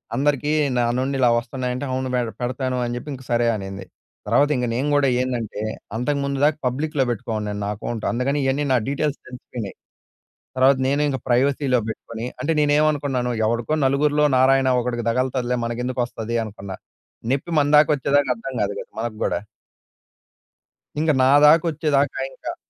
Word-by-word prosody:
అందరికి 145 Hz, +2 st, +1 dB, 0.3 s
నా 120 Hz, -, +3 dB, 0.2 s
నుండి 135 Hz, +1 st, -1 dB
ఇలా 125 Hz, -2 st, +5 dB
వస్తున్నాయి 125 Hz, +1 st, -4 dB
అంటే, 135 Hz, +3 st, -4 dB
అవును 130 Hz, 0 st, -2 dB
మేడ్ 120 Hz, -2 st, 0 dB
పెడతాను 130 Hz, +1 st, -2 dB
అని 120 Hz, -, -3 dB
జెప్పి 135 Hz, +5 st, -8 dB
ఇంక 130 Hz, 0 st, -9 dB
సరే 120 Hz, 0 st, +2 dB
అనింది. 95 Hz, -1 st, -6 dB, 0.4 s
తర్వాత 145 Hz, +1 st, +3 dB
ఇంగక 125 Hz, -2 st, -1 dB
నేను 130 Hz, +4 st, 0 dB
గూడా 140 Hz, -2 st, +3 dB
ఏందంటే, 120 Hz, -5 st, -3 dB, 0.4 s
అంతకుముందు 140 Hz, +2 st, -1 dB
దాకా 150 Hz, 0 st, +2 dB
పబ్లిక్‌‌‌‌‌‌లో 145 Hz, +2 st, -1 dB
పెట్టుకోనున్నాను 105 Hz, -3 st, -3 dB
నా -, -, -2 dB
అకౌంట్. 110 Hz, +2 st, -5 dB
అందుకని 130 Hz, +4 st, 0 dB
ఇయ్యన్నీ 135 Hz, +2 st, 0 dB
నా -, -, +5 dB
డీటెయిల్స్ 145 Hz, +1 st, -1 dB
తెలిసిపోయినయి. 125 Hz, -4 st, -7 dB, 0.8 s
తర్వాత 130 Hz, +1 st, +5 dB
నేను 140 Hz, +1 st, +1 dB
ఇంక 135 Hz, -2 st, -1 dB
ప్రైవసీలో 130 Hz, +1 st, +2 dB
పెట్టుకొని, 115 Hz, +1 st, -6 dB
అంటే 165 Hz, -, 0 dB
నేనేమనుకున్నాను 145 Hz, -4 st, +1 dB, 0.2 s
ఎవడికో 120 Hz, +7 st, 0 dB
నలుగురిలో 145 Hz, +2 st, +3 dB
నారాయణ 130 Hz, +1 st, +4 dB
ఒకడికి 120 Hz, -1 st, -3 dB
తగుల్తదిలే 125 Hz, 0 st, 0 dB
మనకెందుకొస్తది 120 Hz, -1 st, -3 dB
అనుకున్నా. 100 Hz, -3 st, -8 dB, 0.6 s
నెప్పి 140 Hz, +5 st, -2 dB
మన 145 Hz, -1 st, +3 dB
దాకా 150 Hz, +1 st, +6 dB
వచ్చేదాక 140 Hz, 0 st, +1 dB
అర్థం 130 Hz, +3 st, -7 dB
కాదు 100 Hz, -, -1 dB
గదా! -, -, -7 dB, 0.2 s
మనకు 115 Hz, -1 st, -4 dB
గూడా. -, -, 0 dB, 1.6 s
ఇంగ 155 Hz, +1 st, +2 dB
నాదాకా 150 Hz, +5 st, +6 dB
వచ్చేదాకా 145 Hz, -2 st, 0 dB
ఇంకా -, -, -6 dB
130 Hz, 150 wpm, -22 LUFS, 120-145 Hz, 1.6 s, దాకా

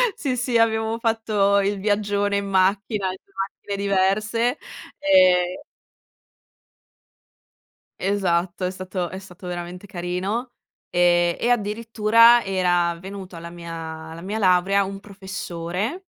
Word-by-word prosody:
sì, 265 Hz, -5 st, -2 dB
sì 245 Hz, -1 st, +1 dB
abbiamo 220 Hz, 0 st, +1 dB
fatto 215 Hz, -3 st, +2 dB
il 200 Hz, 0 st, 0 dB
viaggione 205 Hz, 0 st, 0 dB
in 200 Hz, -, -2 dB
macchina, 195 Hz, +1 st, +1 dB
in 185 Hz, -, -4 dB
2 195 Hz, -, -33 dB
macchine 195 Hz, +1 st, -4 dB
diverse 215 Hz, +6 st, +1 dB, 0.4 s
ehm 185 Hz, -10 st, +4 dB, 2.4 s
Esatto, 185 Hz, -2 st, 0 dB
è 180 Hz, -, -1 dB
stato 185 Hz, -1 st, -4 dB
è 190 Hz, -, -7 dB
stato 180 Hz, -1 st, -12 dB
veramente 180 Hz, +2 st, -6 dB
carino, 190 Hz, +8 st, -3 dB, 0.4 s
ehm, 175 Hz, -1 st, +3 dB
e 240 Hz, -, 0 dB
addirittura 230 Hz, +1 st, +4 dB
era 175 Hz, -3 st, +1 dB
venuto 190 Hz, -2 st, -9 dB
alla 170 Hz, +1 st, -8 dB
mia 170 Hz, -1 st, -9 dB
alla 160 Hz, 0 st, -7 dB
mia 205 Hz, +4 st, -4 dB
laurea 195 Hz, 0 st, +3 dB
un 195 Hz, 0 st, -6 dB
professore, 195 Hz, -, -5 dB
195 Hz, 120 wpm, -23 LUFS, 180-215 Hz, 2.4 s, ehm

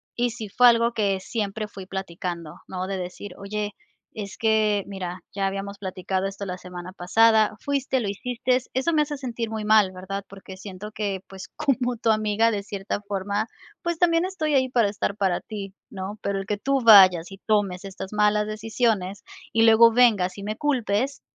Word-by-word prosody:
y 240 Hz, 0 st, +1 dB
sí 215 Hz, -3 st, -7 dB
fue 250 Hz, +4 st, +5 dB
algo 235 Hz, 0 st, +4 dB
que 200 Hz, -4 st, +1 dB
siempre 210 Hz, +1 st, -3 dB
fui 195 Hz, -2 st, -10 dB
platicando, 175 Hz, -4 st, -5 dB
¿no? 185 Hz, 0 st, -4 dB
De 195 Hz, -, -3 dB
decir: 180 Hz, +1 st, -7 dB
"Oye, 205 Hz, +1 st, -4 dB, 0.4 s
es 200 Hz, -2 st, -7 dB
que 215 Hz, -2 st, +2 dB
mira, 185 Hz, -2 st, -6 dB
ya 195 Hz, -1 st, 0 dB
habíamos 195 Hz, +1 st, -3 dB
platicado 190 Hz, 0 st, -3 dB
esto 195 Hz, +1 st, -4 dB
la 180 Hz, 0 st, -4 dB
semana 180 Hz, 0 st, -9 dB
pasada. 215 Hz, +3 st, +4 dB
Fuiste, 275 Hz, -2 st, -1 dB
lo 205 Hz, -4 st, -2 dB
hiciste, 250 Hz, +4 st, 0 dB, 0.2 s
eso 260 Hz, +6 st, +1 dB
me 300 Hz, -1 st, +4 dB
hace 295 Hz, 0 st, -4 dB
sentir 235 Hz, -4 st, -4 dB
muy 220 Hz, -1 st, -3 dB
mal, 210 Hz, -3 st, +5 dB
¿verdad? 190 Hz, +2 st, -6 dB
Porque 190 Hz, -1 st, -11 dB
siento 195 Hz, +2 st, -8 dB
que, 205 Hz, -3 st, -2 dB
pues, 190 Hz, -1 st, -10 dB
como 255 Hz, -5 st, 0 dB
tu 225 Hz, 0 st, 0 dB
amiga, 215 Hz, +1 st, +3 dB
de 205 Hz, -3 st, -2 dB
cierta 200 Hz, 0 st, -4 dB
forma, 200 Hz, +1 st, -2 dB, 0.4 s
pues, 340 Hz, -1 st, -2 dB
también 335 Hz, -1 st, +3 dB
estoy 315 Hz, -6 st, -1 dB
ahí, 260 Hz, -1 st, +3 dB
para 235 Hz, -5 st, +3 dB
estar 200 Hz, -1 st, -2 dB
para 190 Hz, -3 st, +1 dB
ti, 200 Hz, -3 st, -7 dB, 0.2 s
¿no? 195 Hz, +2 st, -6 dB
Pero 200 Hz, -1 st, -1 dB
el 195 Hz, -, -6 dB
que 210 Hz, -, -1 dB
tú 275 Hz, +4 st, 0 dB
vayas 190 Hz, -5 st, +8 dB
y 195 Hz, -, -9 dB
tomes 200 Hz, -3 st, +1 dB
estas 190 Hz, 0 st, -7 dB
malas 210 Hz, 0 st, +2 dB
decisiones, 215 Hz, -3 st, -1 dB, 0.3 s
y 225 Hz, 0 st, +4 dB
luego 230 Hz, +1 st, +7 dB
vengas 215 Hz, -6 st, +3 dB
y -, -, -7 dB
me 215 Hz, +1 st, -3 dB
culpes, 260 Hz, -3 st, 0 dB
210 Hz, 190 wpm, -24 LUFS, 195-230 Hz, 0.4 s, vayas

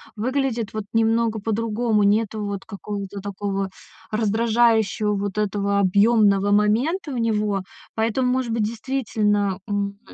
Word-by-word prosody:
выглядит 240 Hz, -1 st, -1 dB
вот 215 Hz, -2 st, -4 dB
немного 225 Hz, 0 st, +2 dB
по-другому. 220 Hz, 0 st, 0 dB
Нету 215 Hz, +1 st, +1 dB
вот 200 Hz, -1 st, -5 dB
какого-то 200 Hz, -1 st, -6 dB
такого 195 Hz, -1 st, -3 dB, 0.4 s
раздражающего, 220 Hz, -1 st, +2 dB
вот 200 Hz, 0 st, -3 dB
этого 200 Hz, -1 st, 0 dB
объёмного 200 Hz, 0 st, +4 dB
момента 245 Hz, -, +1 dB
у -, -, -3 dB
него. 210 Hz, -4 st, 0 dB, 0.3 s
Поэтому, 230 Hz, +3 st, +1 dB
может 255 Hz, -2 st, -1 dB
быть, 225 Hz, -2 st, 0 dB
действительно, 215 Hz, -4 st, -1 dB
м, 200 Hz, 0 st, -2 dB
215 Hz, 120 wpm, -23 LUFS, 200-230 Hz, 0.4 s, объёмного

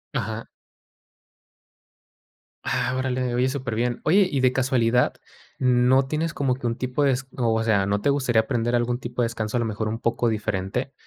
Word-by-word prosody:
Ajá. 110 Hz, -2 st, -3 dB, 2.2 s
Ah, 125 Hz, +1 st, -1 dB
órale, 130 Hz, -1 st, -1 dB
oye, 125 Hz, +1 st, +2 dB
super 130 Hz, -4 st, -3 dB
bién. 120 Hz, +1 st, -1 dB
Oye, 190 Hz, +4 st, +5 dB
y 140 Hz, -, 0 dB
de 130 Hz, -1 st, +4 dB
casualidad, 125 Hz, -2 st, +2 dB, 0.5 s
¿no 125 Hz, +1 st, +3 dB
tienes, 155 Hz, +3 st, -2 dB
como 135 Hz, -3 st, 0 dB
que 130 Hz, -, -9 dB
un 115 Hz, -, -1 dB
tipo 130 Hz, +3 st, -1 dB
de 140 Hz, -, +4 dB
es 130 Hz, +1 st, -2 dB
o 115 Hz, -2 st, +1 dB
sea, 100 Hz, -4 st, +2 dB
no 100 Hz, +1 st, 0 dB
te 140 Hz, -, +1 dB
gustaría 130 Hz, -5 st, +2 dB
aprender 120 Hz, 0 st, -1 dB
algún 120 Hz, +1 st, 0 dB
tipo 120 Hz, 0 st, -4 dB
de -, -, +3 dB
descanso, 115 Hz, 0 st, -3 dB
a -, -, +1 dB
lo 115 Hz, -, 0 dB
mejor 110 Hz, 0 st, -3 dB
un 115 Hz, +2 st, -3 dB
poco 115 Hz, 0 st, 0 dB
diferente, 110 Hz, +4 st, -2 dB
125 Hz, 185 wpm, -24 LUFS, 115-130 Hz, 2.2 s, Oye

